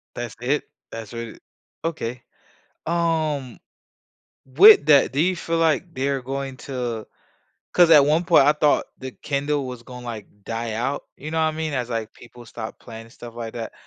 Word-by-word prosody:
That's 120 -2 -5
it? 140 +5 0 0.3
That's 115 -1 -8
really 115 -1 -7 0.5
okay, 125 -7 -4 0.6
um 160 -6 -1 0.9
with 155 +5 +8
that, 145 -4 +5
do 140 - 0
you 180 +3 +2
feel 165 0 -2
like 165 +1 +1
they're 135 0 -1
going 135 +1 -4
to 120 -5 -4 0.7
'cause 175 -2 +6
at 150 -3 +8
one 155 +4 +2
point 165 -5 +6
I 150 - +5
thought 150 -1 +2
the 130 0 -7
Kindle 145 +1 -2
was 125 -2 -8
gonna, 125 0 -10
like, 110 -4 -6 0.2
die 115 0 -4
out, 125 +6 -2
you 155 +3 -7
know 160 - -2
what 160 -1 +2
I - - -8
mean, 160 -2 -2
as, 125 -3 -2
like, 115 -2 -4
people 120 0 -15
stop 115 -1 -8
playing 115 -1 -10
and 115 - -17
stuff 120 -1 -11
like 115 -1 -6
that. 115 -2 -6
135 Hz, 180 wpm, -23 LUFS, 120-155 Hz, 0.9 s, with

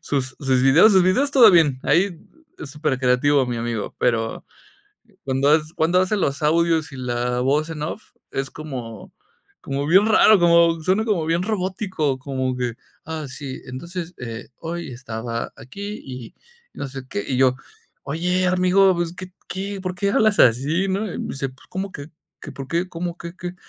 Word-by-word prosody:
sus 135 -4 -3
sus 130 -3 +1
videos 160 +11 +6
sus 190 -1 +6
videos, 260 +11 +2
todo 240 -5 +8
bien, 155 -7 +4
ahí 180 -1 +1 0.4
es 140 - -8
súper 145 -3 -2
creativo 130 +2 +3
mi 120 -1 -3
amigo, 115 -2 -4
pero 115 -2 0 0.8
cuando 135 +1 +1
hac 155 0 +4
cuando 170 +3 +2
hace 185 +3 +1
los 140 -6 -1
audios 160 -1 +2
y - - -9
la 125 -1 -2
voz 145 +5 +1
en 150 -2 -6
off, 175 +7 -6 0.2
es 135 -1 -3
como 125 -8 -8 0.5
como 140 +1 -3
bien 190 +5 +5
raro, 215 -1 +6
como 170 -1 +4
suena 190 +6 +1
como 195 -8 0
bien 165 +2 +1
robótico, 185 -8 -2
como 130 -1 -2
que: 125 -2 -2 0.3
"Ah, 160 -1 -5
sí, 130 0 -7
entonces, 170 +7 -7
eh, 115 +1 -7
hoy 170 -1 -5
estaba 115 -1 -5
aquí 200 - -8
y 125 -3 -9 0.4
no 140 - -5
sé 135 -1 -8
qué", 100 - -3
y 130 - -1
yo: 130 -1 +4 0.5
"Oye, 180 +6 0
amigo, 185 +1 +4
pues, 170 0 -2
¿qué 185 0 -9
qué?, 195 +1 -5
¿por 185 -1 -4
qué 200 +2 0
hablas 215 -1 +3
así?", 140 +11 +3
¿no?, 195 +1 -2
y - - -6
me - - -4
dice: 135 0 -3
"Pues, 130 +2 -19
¿cómo 190 +1 -4
que 145 +1 -9 0.3
que - - -8
por 135 -1 -8
qué?, 170 +5 -1
¿cómo 175 0 -5
qué, 170 -1 -8
qué?", 180 0 -6
155 Hz, 180 wpm, -22 LUFS, 130-185 Hz, 0.8 s, todo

